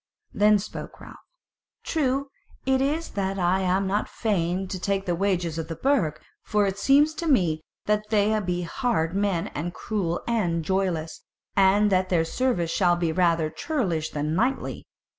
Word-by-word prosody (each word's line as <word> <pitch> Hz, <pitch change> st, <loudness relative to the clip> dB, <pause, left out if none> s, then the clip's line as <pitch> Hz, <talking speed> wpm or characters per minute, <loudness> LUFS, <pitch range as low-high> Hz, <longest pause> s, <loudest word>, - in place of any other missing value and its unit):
Then 210 Hz, 0 st, +5 dB
spoke 200 Hz, -, -7 dB
Ralph: -, -, -12 dB, 0.6 s
"True 275 Hz, -3 st, 0 dB, 0.4 s
it 265 Hz, 0 st, +2 dB
is 305 Hz, +5 st, 0 dB
that 195 Hz, -1 st, -2 dB
I 180 Hz, +1 st, +2 dB
am 190 Hz, +1 st, +1 dB
not 200 Hz, +2 st, -1 dB
fain 190 Hz, -3 st, -1 dB
to 185 Hz, -, -4 dB
take 195 Hz, +1 st, -1 dB
the 175 Hz, -, 0 dB
wages 175 Hz, -3 st, 0 dB
of 160 Hz, -, -4 dB
the 165 Hz, -, -5 dB
Burg; 180 Hz, -, +1 dB, 0.2 s
for 210 Hz, -1 st, +1 dB
it 195 Hz, 0 st, -2 dB
seems 285 Hz, +7 st, +4 dB
to 335 Hz, +1 st, -4 dB
me 175 Hz, -, +2 dB, 0.2 s
that 210 Hz, 0 st, 0 dB
they 215 Hz, 0 st, +2 dB
be 180 Hz, -3 st, -2 dB
hard 175 Hz, -4 st, -1 dB
men, 195 Hz, -4 st, 0 dB
and 170 Hz, +4 st, -5 dB
cruel 180 Hz, -6 st, -2 dB
and 175 Hz, -9 st, 0 dB
joyless, 180 Hz, -4 st, -1 dB, 0.3 s
and 200 Hz, +2 st, +4 dB
that 185 Hz, 0 st, +2 dB
their 165 Hz, -3 st, +2 dB
service 175 Hz, -4 st, 0 dB
shall 175 Hz, -2 st, +3 dB
be 170 Hz, -2 st, 0 dB
rather 165 Hz, -2 st, +2 dB
churlish 180 Hz, -, -2 dB
than 150 Hz, +1 st, -2 dB
knightly. 245 Hz, +10 st, -1 dB
190 Hz, 165 wpm, -25 LUFS, 170-215 Hz, 0.6 s, Then